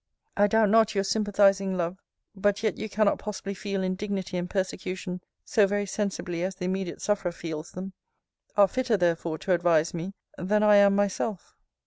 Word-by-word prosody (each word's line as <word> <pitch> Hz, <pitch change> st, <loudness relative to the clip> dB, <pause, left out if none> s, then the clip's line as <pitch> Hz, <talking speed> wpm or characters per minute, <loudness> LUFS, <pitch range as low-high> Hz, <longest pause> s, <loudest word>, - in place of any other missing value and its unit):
I 205 Hz, 0 st, +4 dB
doubt 220 Hz, -1 st, +3 dB
not 225 Hz, -1 st, +4 dB
your 195 Hz, -, +2 dB
sympathizing 195 Hz, -2 st, +2 dB
love: 175 Hz, +2 st, -2 dB, 0.4 s
but 205 Hz, +2 st, 0 dB
yet 215 Hz, -, +1 dB
you 220 Hz, -, -5 dB
cannot 210 Hz, 0 st, +2 dB
possibly 200 Hz, -1 st, -5 dB
feel 195 Hz, 0 st, -3 dB
indignity 190 Hz, 0 st, -3 dB
and 180 Hz, 0 st, -2 dB
persecution 185 Hz, -1 st, -3 dB, 0.2 s
so 210 Hz, -3 st, +3 dB
very 205 Hz, +1 st, -1 dB
sensibly 190 Hz, -4 st, -3 dB
as 190 Hz, +1 st, -2 dB
the 180 Hz, -1 st, -5 dB
immediate 185 Hz, -1 st, -3 dB
sufferer 200 Hz, -4 st, 0 dB
feels 165 Hz, -1 st, -7 dB
them 190 Hz, +1 st, -7 dB, 0.6 s
are 200 Hz, -1 st, +7 dB
fitter 245 Hz, +1 st, 0 dB
therefore 170 Hz, -2 st, 0 dB
to 190 Hz, -, -3 dB
advise 170 Hz, -2 st, +2 dB
me, 175 Hz, +4 st, -5 dB, 0.2 s
than 210 Hz, +4 st, +1 dB
I 210 Hz, -1 st, +6 dB
am 200 Hz, 0 st, +6 dB
myself. 200 Hz, 0 st, -1 dB
195 Hz, 170 wpm, -27 LUFS, 180-205 Hz, 0.6 s, are